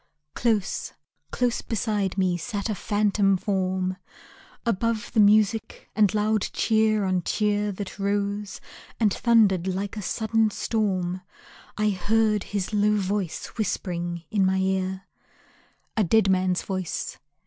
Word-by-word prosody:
Close, 215 -5 -1 0.4
close 245 -1 0
beside 210 -3 -1
me, 185 -2 +2
sat 200 +5 -3
a - - 0
phantom 205 -1 +1
form; 185 -1 -1 0.7
Above 230 +1 -1
the 225 - +2
music 210 +1 +3
and 215 -1 +3
loud 215 0 +2
cheer 220 -2 +2
on 185 -1 +1
cheer 210 +2 0
That 200 0 -7
rose, 200 0 -2 0.4
and 210 -4 +3
thundered 210 -7 +3
like 195 +3 -2
a 210 - -4
sudden 220 +2 +1
storm, 190 -5 -1 0.6
I 210 0 +2
heard 210 +2 +1
his 200 0 -3
low 210 0 +3
voice 195 -3 -2
whispering 175 -4 -2
in 205 -3 +2
my 190 0 +2
ear. 190 0 -1 0.9
A 220 - +3
dead 200 +1 +3
man's 185 -1 +1
voice. 185 -3 -4
205 Hz, 125 wpm, -25 LUFS, 190-215 Hz, 0.9 s, music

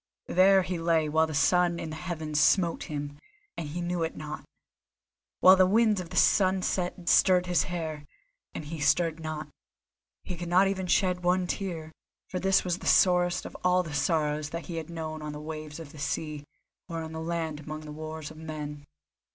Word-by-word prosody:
There 190 +1 +5
he 180 -1 -3
lay 165 -2 +2
while 160 +1 +3
the 155 - -5
sun 175 +2 +3
in 160 - -5
the - - -5
heavens 160 -3 -3
smote 170 +1 +3
him, 145 -1 -5 0.4
and 155 - -5
he 175 +4 -4
knew 175 0 -2
it 160 - -2
not; 155 0 -6 1.0
while 185 +1 +9
the 185 -1 +5
wind 215 0 +3
of 175 -2 -6
the - - -8
sunset 185 -2 +2
stirred 180 -1 +5
in - - -8
his 175 - +3
hair, 160 -4 -5 0.5
and 155 - -5
he 160 +2 -6
stirred 160 +3 +2
not. 155 -1 -5 0.7
He 180 - -5
could 175 0 -6
not 185 +3 +5
even 190 -1 -2
shed 180 -1 +2
one 180 +1 +2
tear, 175 -4 -4 0.4
for 185 - -3
this 190 +1 +3
was 180 0 -1
the - - -6
sorest 180 -1 +4
of - - -8
all 180 0 +3
the 155 -3 -7
sorrows 150 0 0
that 170 +1 -6
he 170 - -5
had 160 0 -5
known 160 -2 -5
on 150 -1 -5
the 150 - -7
waves 155 0 -7
of 155 -3 -9
the 150 - -12
sea, 150 0 -3 0.4
or 165 -1 -4
on 160 0 -7
land 160 -1 -3
among 155 +1 -7
the 150 -1 -9
wars 155 0 -7
of 155 - -13
men. 150 -2 -7
165 Hz, 200 wpm, -28 LUFS, 155-180 Hz, 1.0 s, while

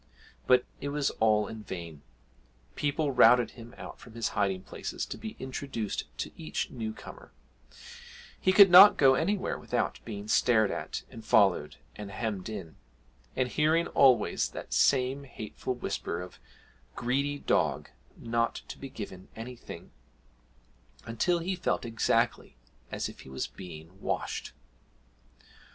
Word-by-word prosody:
But 125 -1 +5
it 140 - -4
was 145 -1 0
all 110 -1 +3
in 110 -1 -8
vain; 85 -7 -7 0.7
people 145 0 0
routed 125 -2 +6
him 115 -1 -12
out - - -9
from 115 -2 -14
his 115 -1 -1
hiding 95 -2 -1
places - - -5
to - - -6
be 220 0 -7
introduced 130 -5 -4
to - - -4
each - - -4
new 110 -3 -4
comer; - - -12 1.1
he 185 - +3
could 195 -1 +8
not 190 +3 +10
go 135 -2 +6
anywhere 185 +8 0
without - - -2
being 105 -2 -7
stared 110 -2 +3
at, - - -4
and 115 - -10
followed, 95 -10 +3 0.2
and 105 -1 -7
hemmed 105 -2 -4
in, 85 -7 -7 0.6
and 125 -1 0
hearing 155 +5 +2
always 125 -5 +4
that - - -7
same 135 +1 +2
hateful 120 +1 -5
whisper 85 -7 -3
of 90 0 -9 0.6
'Greedy 140 +4 0
dog - - 0 0.3
not 115 0 -1
to - - -8
be 135 - -7
given 95 -6 -8
anything,' 120 +2 -9 1.1
until 115 +10 +1
he 180 +3 -2
felt 175 - -1
exactly 115 - 0 0.3
as - - -2
if - - -11
he - - -12
was 65 0 -3
being 90 +1 -11
washed! - - -3
115 Hz, 140 wpm, -29 LUFS, 105-140 Hz, 1.1 s, not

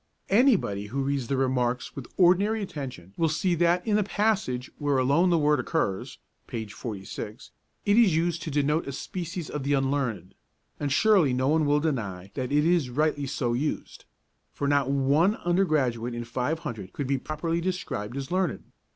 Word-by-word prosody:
Anybody 195 - +3
who 135 +6 -2
reads 135 -3 -1
the 135 - 0
'Remarks' 125 -2 0
with 135 -3 -8
ordinary 200 +4 +4
attention 130 - -7
will 165 -1 +2
see 160 +4 +1
that 175 +1 +2
in 210 -2 +2
the 210 - +2
passage 195 - 0
where 145 -2 +1
alone 140 +8 +3
the 170 - +4
word 150 -2 +3
occurs 125 - -2 0.3
(p. 110 -1 -4
46) 105 +1 -7 0.3
it 205 +1 +4
is 200 -9 +5
used 170 0 0
to 160 - -4
denote 150 +2 +1
a 140 - -4
species 170 +2 -5
of 150 - -4
the 140 +2 0
unlearned, 135 -9 -1 0.5
and 145 -1 -2
surely 185 - +4
no 130 +2 +1
one 155 -1 +3
will 145 0 +3
deny 100 - -3
that 130 -1 -3
it 150 +1 +3
is 170 -6 +2
rightly 145 +1 0
so 125 -3 -1
used; 145 +6 -3 0.5
for 140 - -3
not 140 -2 +2
one 140 +8 +3
undergraduate 145 - 0
in 120 - -4
five 125 +6 -2
hundred 110 - -7
could 145 - -3
be 135 0 0
properly 165 +4 -2
described 140 - -3
as 135 +2 -5
learned. 185 -5 -1
145 Hz, 175 wpm, -27 LUFS, 125-170 Hz, 0.5 s, is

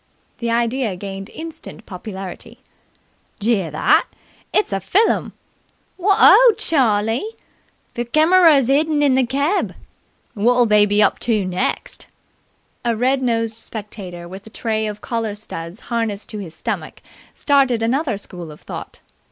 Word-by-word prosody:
The 235 - -2
idea 235 -2 0
gained 195 +2 -7
instant 320 -8 -8
popularity. 190 -1 -8 0.8
"Jear 205 -5 +1
that? 150 - +2 0.4
It's 415 - +1
a 195 - 0
fillum!" 390 - +1 0.6
"Wot 390 +2 +2
o', - - +8
Charlie!" 235 - +1 0.6
"The 240 - -2
kemerer's 310 0 +5
'idden 295 +2 +2
in 280 -2 +4
the 260 -1 +2
keb." 280 - 0 0.6
"Wot'll 245 +3 +3
they 210 -1 +4
be 205 +1 +3
up 205 - +2
to 215 -5 0
next!" 185 0 -3 0.8
A 235 -1 +1
red 260 +4 +1
nosed 230 -3 0
spectator 195 -5 -7
with 190 +4 -10
a - - -10
tray 220 -1 -2
of 210 0 -6
collar 225 -3 -3
studs 175 -3 -8
harnessed 220 -3 -2
to 215 - -4
his 170 -5 -8
stomach - - -5 0.3
started 270 -5 +2
another 250 -1 0
school 175 -5 -8
of 150 - -14
thought. - - -9
225 Hz, 135 wpm, -20 LUFS, 200-270 Hz, 0.8 s, o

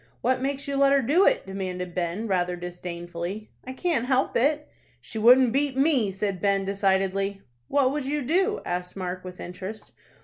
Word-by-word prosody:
"What 255 +1 +1
makes 275 +1 -2
you 280 0 -1
let 275 0 +5
her 275 -1 +3
do 320 +11 +4
it?" - - +2
demanded 185 -2 -5
Ben, 175 +5 -2
rather 180 -2 0
disdainfully. 175 +3 -6
"I 260 - -6
can't 260 -5 0
help 265 0 +1
it." 295 +5 +2 0.3
"She 220 - -7
wouldn't 245 +1 +6
beat 275 -1 0
me," 270 -7 +3
said 195 -1 -3
Ben, 200 -1 +1
decidedly. 195 0 0 0.2
"What 270 - +2
would 290 -1 -3
you 290 +1 -1
do?" 380 - +1
asked 180 0 -4
Mark, 185 -1 -4
with 180 0 -9
interest. 185 +4 -8
210 Hz, 175 wpm, -26 LUFS, 185-270 Hz, 0.3 s, wouldn't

